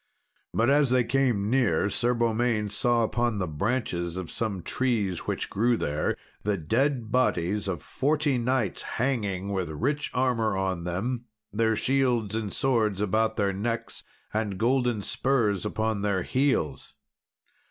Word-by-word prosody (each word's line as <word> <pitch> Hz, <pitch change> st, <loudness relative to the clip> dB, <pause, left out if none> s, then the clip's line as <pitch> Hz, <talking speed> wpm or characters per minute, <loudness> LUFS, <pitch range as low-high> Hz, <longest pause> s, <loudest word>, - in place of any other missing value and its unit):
But 115 Hz, +4 st, +2 dB
as 145 Hz, -2 st, +4 dB
they 125 Hz, 0 st, +3 dB
came 120 Hz, -4 st, +1 dB
near 115 Hz, -10 st, +2 dB
Sir 120 Hz, +4 st, +1 dB
Beaumains 115 Hz, -3 st, 0 dB
saw 120 Hz, +2 st, +3 dB
upon 120 Hz, 0 st, 0 dB
the 95 Hz, -, 0 dB
branches 85 Hz, -, -2 dB
of 95 Hz, -3 st, -5 dB
some 100 Hz, -6 st, -3 dB
trees 110 Hz, -9 st, -1 dB
which -, -, -2 dB
grew 115 Hz, +3 st, +1 dB
there, 75 Hz, -4 st, -1 dB, 0.2 s
the 105 Hz, -1 st, 0 dB
dead 115 Hz, -, 0 dB
bodies 105 Hz, -5 st, +1 dB
of 90 Hz, -6 st, -3 dB
forty 145 Hz, -2 st, +1 dB
knights 120 Hz, -4 st, 0 dB
hanging, 105 Hz, -7 st, -1 dB
with 95 Hz, -4 st, -1 dB
rich 140 Hz, -, -1 dB
armour 115 Hz, -5 st, +1 dB
on 95 Hz, -3 st, -1 dB
them, 115 Hz, +8 st, -2 dB, 0.3 s
their 110 Hz, +1 st, +2 dB
shields 125 Hz, -4 st, +1 dB
and 110 Hz, -3 st, -2 dB
swords 110 Hz, -7 st, +1 dB
about 110 Hz, +2 st, +1 dB
their 100 Hz, -2 st, +1 dB
necks, 115 Hz, +4 st, -3 dB, 0.3 s
and 105 Hz, -3 st, -1 dB
golden 120 Hz, -1 st, +1 dB
spurs 115 Hz, -9 st, +1 dB
upon 110 Hz, -1 st, -1 dB
their 100 Hz, -3 st, 0 dB
heels. 130 Hz, -, 0 dB
110 Hz, 140 wpm, -27 LUFS, 100-125 Hz, 0.3 s, as